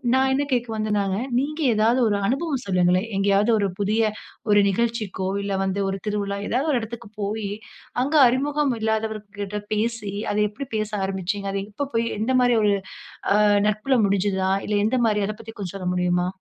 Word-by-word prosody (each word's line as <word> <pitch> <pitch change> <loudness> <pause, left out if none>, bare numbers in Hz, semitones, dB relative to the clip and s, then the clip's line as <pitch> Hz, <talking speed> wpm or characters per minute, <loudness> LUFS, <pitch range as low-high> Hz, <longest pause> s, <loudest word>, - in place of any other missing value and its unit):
நான் 265 0 +3
என்ன 285 +1 +1
கேட்க 245 -1 0
வந்தேன்னாக, 205 -3 0 0.2
நீங்க 300 +4 -3 0.2
ஏதாவது 230 +4 +3
ஒரு 205 -1 +1
அனுபவம் 275 0 -1
சொல்லுங்களேன். 180 +2 +2
எங்கேயாவது 200 +3 +3
ஒரு 200 -1 +1
புதிய 215 +1 +1 0.4
ஒரு 205 0 +6
நிகழ்ச்சிக்கோ, 215 -3 -1
இல்ல 200 0 -2
வந்து 195 +1 -1
ஒரு 195 0 -3
திருவிழா. 200 -1 -2
ஏதாவது 270 +6 0
ஒரு 250 - +2
இடத்துக்கு 230 -1 -8
போய். 205 0 -2 0.5
அங்கு 300 +3 +3
அறிமுகம் 280 +2 +1
இல்லாதவர்கள்ட 215 -2 -2
பேசி, 215 -2 -2 0.2
அத 205 - -1
எப்டி 255 +7 -7
பேச 215 -1 -2 0.2
ஆரம்பிச்சீங்க? 195 +1 -3
அது 195 - -1
எப்ப 275 +6 -4
போய் 230 0 +2
எந்த 225 +4 0
மாரி 245 -1 +4
ஒரு 205 - +4 0.6
ஆ - - +3 0.3
நட்புல 215 +6 0
முடிஞ்சிதா? 190 -1 +1 0.2
இல்ல 210 - -1
எந்த 245 +4 +1
மாரி, 210 -2 +2
அத 215 - -3
பத்தி 225 0 -9
கொஞ்சம் 195 -3 -5
சொல்ல 185 -2 -4
முடியுமா? 180 0 +1
210 Hz, 170 wpm, -23 LUFS, 200-235 Hz, 0.6 s, ஒரு